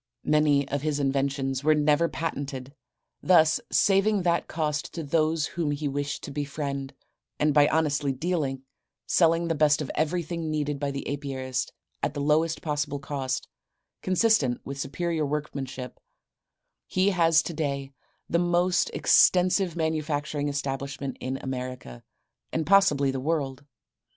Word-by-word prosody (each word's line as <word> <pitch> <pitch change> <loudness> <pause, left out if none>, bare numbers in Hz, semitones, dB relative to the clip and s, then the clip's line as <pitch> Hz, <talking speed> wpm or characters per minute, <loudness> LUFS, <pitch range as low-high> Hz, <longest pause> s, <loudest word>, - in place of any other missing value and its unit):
Many 150 -2 +3
of 145 0 -1
his 150 -1 -1
inventions 135 -1 -1
were 155 +1 +4
never 150 +2 +3
patented, 140 -4 -4 0.5
thus 160 -3 +5
saving 195 0 +3
that 170 -1 +1
cost 150 -2 -2
to 165 - -4
those 155 +1 +1
whom 165 -2 -2
he 145 +1 -2
wished 140 0 -3
to - - -6
befriend, 140 -1 -4 0.4
and 150 0 +2
by 145 0 +6
honest 150 -2 +1 0.2
dealing, 150 -7 -1 0.4
selling 165 0 +3
the 165 - +1
best 150 -1 +3
of 150 - -4
everything 165 +1 -2
needed 150 -2 -2
by 140 0 -1
the 140 0 -5
apiarist 135 -3 -3 0.3
at - - -2
the - - -3
lowest 155 +3 +1
possible 145 -2 -2
cost 135 -2 -3 0.5
consistent 185 - +2
with 140 0 -6
superior 165 +3 -2
workmanship, 140 -3 -4 0.9
he 190 +2 +2
has 165 -3 +4
today, 140 -4 -3 0.4
the 170 - +1
most 175 +1 +2
extensive 180 -1 +4
manufacturing 150 -2 -1
establishment 140 -1 -4
in 130 +1 -3
America, 125 - -6 0.5
and 160 -1 -1
possibly 150 -8 +4
the 135 - -3
world. 140 -2 -2
150 Hz, 135 wpm, -26 LUFS, 140-165 Hz, 0.9 s, by